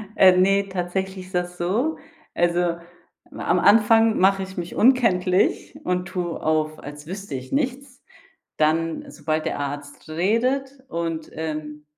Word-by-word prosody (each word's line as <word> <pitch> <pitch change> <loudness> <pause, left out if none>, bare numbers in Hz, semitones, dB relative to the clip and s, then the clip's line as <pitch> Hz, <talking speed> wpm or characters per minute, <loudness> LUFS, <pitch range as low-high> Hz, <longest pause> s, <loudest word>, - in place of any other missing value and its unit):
Äh, 185 -1 +7
ne, 195 +2 +3
tatsächlich 190 +1 -3
ist 185 - -9
das 180 0 -2
so: 225 - 0 0.4
Also, 175 0 +2 0.7
am - - -10
am - - +1
Anfang 225 +1 +5
mache 195 +1 +3
ich 190 0 -10
mich 175 0 -5
unkenntlich 200 -7 +2
und 180 0 -1
tue 175 -2 -4
auf, 155 0 0
als 145 +1 -10
wüsste 195 -4 -6
ich 130 0 -7
nichts. 270 -1 -2 0.6
Dann 160 +1 0
sobald 155 0 -2
der - - -2
Arzt 145 +2 -6
redet 250 - 0
und, 165 -3 -4
ähm, 150 -1 -5
180 Hz, 140 wpm, -23 LUFS, 160-205 Hz, 0.7 s, Äh